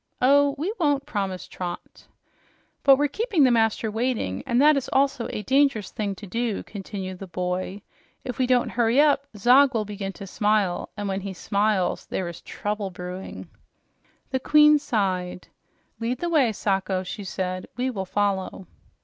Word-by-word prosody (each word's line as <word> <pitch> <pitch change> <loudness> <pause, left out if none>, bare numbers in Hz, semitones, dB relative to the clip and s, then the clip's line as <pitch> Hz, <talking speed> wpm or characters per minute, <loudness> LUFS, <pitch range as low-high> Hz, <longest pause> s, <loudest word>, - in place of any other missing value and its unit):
"Oh, 280 +2 +4
we 345 +9 -2
won't," 290 -4 +1
promised 195 - -4
Trot. 175 -1 -7 0.8
"But 275 -1 +8
we're 290 +1 +2
keeping 410 - +1
the 255 - +5
master 225 -1 +1
waiting, 220 - -1
and 240 - +2
that 300 +2 +6
is 275 - -2
also 270 -3 +1
a 210 - -4
dangerous 265 -3 +2
thing 205 -2 -3
to 205 - -10
do," 230 +2 -2
continued 190 -2 -7
the 195 - -7
boy. 180 +3 -3 0.4
"If 250 -1 -6
we 255 - +2
don't 250 -1 +2
hurry 235 +2 +2
up, 290 -2 +4
Zog 255 +5 +5
will 215 -2 0
begin 200 -1 -5
to 200 - -9
smile, 205 -2 0
and 205 -1 -3
when 195 0 -2
he 195 0 -5
smiles 200 0 0
there 185 - -3
is 170 -1 -8
trouble 205 -1 -4
brewing." 180 +1 -7 0.8
The 260 - 0
queen 300 +2 +6
sighed. 185 -9 -2 0.5
"Lead 235 +2 -1
the 345 +6 -2
way, 285 -8 +3
Sacho," 195 -2 -1
she 205 +3 -6
said. 185 -1 -4
"We 255 +1 0
will 195 -5 -4
follow." 195 -1 -1
215 Hz, 165 wpm, -25 LUFS, 190-265 Hz, 0.8 s, But